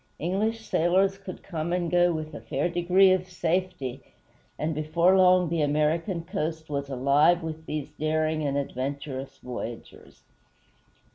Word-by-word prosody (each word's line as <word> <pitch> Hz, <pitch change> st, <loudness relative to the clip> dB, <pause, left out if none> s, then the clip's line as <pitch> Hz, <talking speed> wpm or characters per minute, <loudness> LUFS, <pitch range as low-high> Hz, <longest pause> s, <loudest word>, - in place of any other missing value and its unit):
English 215 Hz, +7 st, -1 dB
sailors 190 Hz, +4 st, +2 dB
could 190 Hz, -2 st, -9 dB
come 170 Hz, -3 st, -4 dB
and 175 Hz, -2 st, -1 dB
go 175 Hz, 0 st, +4 dB
with 155 Hz, -1 st, -4 dB
a -, -, -7 dB
fair 140 Hz, +5 st, -1 dB
degree 180 Hz, +2 st, +4 dB
of 185 Hz, 0 st, 0 dB
safety, 175 Hz, -7 st, -2 dB, 0.6 s
and 155 Hz, +1 st, -1 dB
before 165 Hz, +5 st, +2 dB
long 185 Hz, -1 st, +5 dB
the 165 Hz, 0 st, -1 dB
American 155 Hz, +4 st, 0 dB
coast 160 Hz, -4 st, -4 dB
was 140 Hz, -1 st, -3 dB
alive 140 Hz, +6 st, +3 dB
with 160 Hz, 0 st, -6 dB
these 150 Hz, -2 st, -4 dB
daring 155 Hz, 0 st, 0 dB
and 140 Hz, -2 st, -1 dB
adventurous 135 Hz, 0 st, -4 dB
voyagers. 120 Hz, -2 st, -8 dB
160 Hz, 140 wpm, -26 LUFS, 145-180 Hz, 0.6 s, long